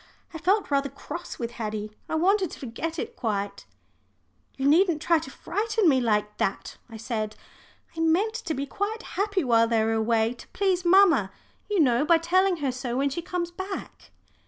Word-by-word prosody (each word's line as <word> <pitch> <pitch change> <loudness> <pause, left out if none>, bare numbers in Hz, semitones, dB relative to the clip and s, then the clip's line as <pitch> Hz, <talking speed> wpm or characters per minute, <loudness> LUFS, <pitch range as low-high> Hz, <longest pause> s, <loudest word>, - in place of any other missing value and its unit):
I 325 - -6
felt 385 +1 +1
rather 280 0 +1
cross 335 +5 -8
with 235 -1 -4
Haddie; 215 -2 -4 0.2
I - - -1
wanted 375 +3 +2
to - - -10
forget 300 +7 -5
it 465 +5 -5
quite. 200 - -3 0.9
"You 270 0 0
needn't 335 +1 +4
try 335 +1 +3
to 310 - -8
frighten 430 +6 -1
me 265 -4 +4
like 210 -2 0
that," 195 - -2
I 225 - -9
said. 215 -2 -3 0.6
"I - - -7
meant 340 +7 +2
to 400 -9 -3
be 275 - -2
quite 420 - -3
happy 400 -2 0
while 230 -3 +4
they 225 -1 +2
were 225 0 +1
away 225 +1 +1
to 240 - -14
please 375 -2 +1
mamma, 345 - +5 0.4
you 415 -2 +1
know, 250 -4 +4
by 335 +2 +5
telling 365 +3 +2
her 265 - +1
so 250 -1 -4
when 280 +1 +1
she 340 - -3
comes 345 0 -3
back." 380 +2 -7
310 Hz, 185 wpm, -26 LUFS, 235-370 Hz, 0.9 s, mamma